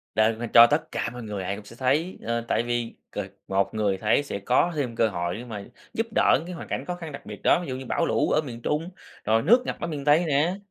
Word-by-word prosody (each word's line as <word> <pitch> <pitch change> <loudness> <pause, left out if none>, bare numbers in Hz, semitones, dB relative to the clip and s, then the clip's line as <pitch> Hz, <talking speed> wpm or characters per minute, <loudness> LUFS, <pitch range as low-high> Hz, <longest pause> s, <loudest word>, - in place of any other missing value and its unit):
Đăng 110 +1 +3
lên 120 -1 -4
cho 115 0 +10
tất - - -1
cả - - -2
mọi 125 -1 -7
người 105 -3 -4
ai 95 +2 -2
cũng 105 0 -11
sẽ 115 - -12
thấy, 140 +9 0
ờ, 115 +1 -1
tại 115 - +1
vì 120 -1 -2 0.2
c - - -12 0.3
một 95 0 0
người 105 -3 0
thấy 105 +8 +2
sẽ 120 -8 -5
có 125 - +2
thêm 130 -6 -2
cơ 115 - +3
hội 85 -2 -2
để 120 - -8
mà 105 -4 -6 0.3
giúp 225 +1 -1
đỡ - - +5
những 155 - -7
cái 180 - -6
hoàn - - -8
cảnh - - -3
khó 180 - -3
khăn 165 -3 -8
đặc - - -9
biệt - - -9
đó, 175 - +4
ví 175 - -6
dụ 130 - -2
như 130 0 -7
bảo 165 - 0
lũ - - +1
ở - - +3
miền 120 -6 -8
Trung, 155 +6 -1 0.3
rồi 110 +1 +3
nước 240 - +5
ngập - - -3
ở 170 - -3
miền 145 -4 -5
Tây 150 +4 +5
nè. 155 +4 +2
120 Hz, 285 wpm, -25 LUFS, 110-155 Hz, 0.3 s, cho